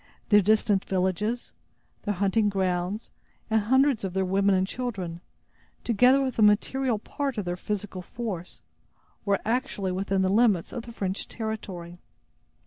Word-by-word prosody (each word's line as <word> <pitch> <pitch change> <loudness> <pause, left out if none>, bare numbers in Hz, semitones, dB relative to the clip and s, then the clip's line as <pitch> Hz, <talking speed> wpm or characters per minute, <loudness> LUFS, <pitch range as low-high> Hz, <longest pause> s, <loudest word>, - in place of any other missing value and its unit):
Their 210 -1 +7
distant 210 -1 +3
villages, 195 +5 -1 0.5
their 205 -1 -2
hunting 200 +3 +2
grounds 190 +1 -1 0.4
and 220 0 +4
hundreds 265 +2 +3
of 190 -2 -3
their 190 0 +1
women 195 +1 +3
and 185 0 +2
children, 190 -7 -4 0.6
together 250 +4 +4
with 260 -3 -3
a - - +4
material 225 +4 +3
part 275 +4 -4
of 205 - -2
their 175 0 -2
physical 195 0 -4
force, 190 -3 -6 0.6
were 200 -1 +2
actually 225 -5 -1
within 190 +1 0
the 185 - +2
limits 205 -4 +3
of 240 -1 -6
the - - -7
French 195 -3 -3
territory. 190 -6 -6
205 Hz, 145 wpm, -27 LUFS, 190-230 Hz, 0.6 s, Their